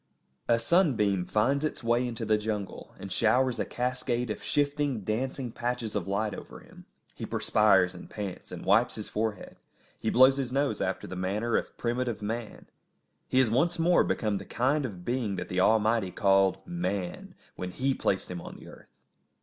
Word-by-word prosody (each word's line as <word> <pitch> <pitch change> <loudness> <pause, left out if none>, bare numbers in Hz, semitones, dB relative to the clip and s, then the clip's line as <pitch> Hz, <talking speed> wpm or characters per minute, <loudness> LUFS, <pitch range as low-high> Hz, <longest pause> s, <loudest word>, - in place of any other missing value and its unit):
A 115 - +4
sunbeam 115 - +2
finds 135 +7 +1
its 155 - -2
way 120 +2 +2
into 115 -1 -4
the 110 0 +2
jungle, 105 -2 -5
and 95 - -8
showers 125 +4 +2
a - - 0
cascade 125 -1 -2
of 105 - -5
shifting, 145 -4 0
dancing 125 +5 -2
patches 120 -2 -3
of 100 -4 -2
light 100 +2 -1
over - - -9
him. - - -16 0.3
He - - -9
perspires 95 -4 +3
and - - -11
pants, 100 -4 -6
and - - -7
wipes 110 +5 +3
his 110 - -6
forehead; 110 -2 -3 0.4
he - - -1
blows 130 +2 +6
his 130 -3 -2
nose 140 +2 0
after 95 0 -2
the 95 - -7
manner 105 +5 -1
of - - -2
primitive 120 -2 -2
man; 110 +1 -5 0.6
he - - -1
has 130 -4 +4
once 170 +9 +2
more 175 +2 +4
become 105 -3 -1
the - - -9
kind 135 +3 +1
of 90 -5 -10
being 120 -5 -1
that - - -5
the 90 - -1
Almighty 110 0 +3
called 95 -1 +2
Man, 100 - -4 0.2
when 90 - -4
He 135 +8 0
placed 95 -7 -1
him 90 -1 -5
on - - -9
the - - -12
earth. - - -15
115 Hz, 180 wpm, -28 LUFS, 100-130 Hz, 0.6 s, blows